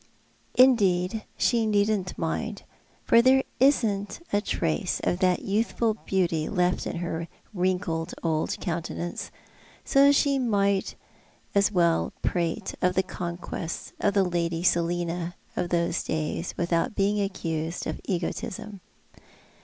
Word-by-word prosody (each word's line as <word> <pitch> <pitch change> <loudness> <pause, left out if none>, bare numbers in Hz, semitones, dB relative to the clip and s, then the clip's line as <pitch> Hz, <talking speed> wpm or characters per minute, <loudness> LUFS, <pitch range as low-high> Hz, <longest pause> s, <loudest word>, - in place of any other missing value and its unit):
'" - - -37
Indeed 215 -5 +4
she 230 -3 +2
needn't 205 -3 +1
mind, 195 +5 -3 0.4
for 230 - +6
there 265 +2 +5 0.2
isn't 210 -7 +2
a 205 - +3
trace 170 -2 -1
of 175 - 0
that 185 -2 +2
youth 210 +4 0
ful 230 -2 +1
beauty 175 -7 -1
left 180 -2 +1
in - - -4
her 170 -1 -3 0.3
wrinkled 180 -3 -1
old 160 -2 0
countenance; 170 0 -4 0.6
so 280 +1 +6
she 280 -1 +3
may 200 -5 +2 1.4
prate 175 +4 -1
of 180 0 +2
the 190 - +3
conquests 170 -2 -5
of 200 0 +1
the 200 - +5
Lady 170 -2 -1
Selina 175 0 0 0.2
of 175 - -1
those 170 0 +1
days 160 +2 -3
without 170 +3 0
being 205 +1 +2
accused 165 -4 -3
of - - -4
egotism. 190 +2 -4
185 Hz, 120 wpm, -26 LUFS, 170-210 Hz, 1.4 s, for